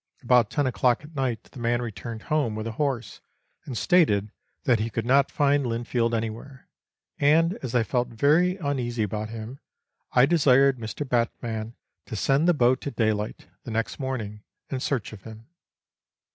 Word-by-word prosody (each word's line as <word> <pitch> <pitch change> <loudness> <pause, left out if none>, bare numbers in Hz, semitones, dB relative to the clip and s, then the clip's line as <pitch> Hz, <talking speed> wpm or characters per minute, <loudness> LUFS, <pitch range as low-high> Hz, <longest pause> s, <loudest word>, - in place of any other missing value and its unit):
About 120 -3 +4
ten 145 - 0
o'clock 125 0 +1
at 150 +2 -13
night 130 -4 -1
the - - -13
man 120 0 +1
returned 115 -1 -6
home 145 -8 0
with 110 0 -4
the 115 - -3
horse, 125 -2 -3 0.4
and 125 -4 -5
stated 110 - +3 0.3
that 120 -5 +3
he 110 +2 -1
could 115 0 -3
not 135 +2 +4
find 145 0 +2
Linfield 120 0 -1
anywhere, 115 +4 -5 0.5
and 165 +4 +4
as 125 -2 -4
I 120 - +4
felt 125 +1 0
very 155 +10 +3
uneasy 125 - -1
about 105 +1 -3
him, 115 +4 -7 0.5
I 125 - +6
desired 140 -4 +4
Mr. 115 +6 -5
Batman 115 -2 -2 0.3
to - - -5
send 135 - +2
the 175 - +4
boat 130 +1 +2
at 140 - -5
daylight 110 -2 -1 0.2
the - - -8
next 115 +1 -2
morning 115 -6 -4 0.3
in 135 - -1
search 130 -5 -2
of 105 - -10
him. 110 +1 -11
120 Hz, 170 wpm, -26 LUFS, 110-140 Hz, 0.5 s, I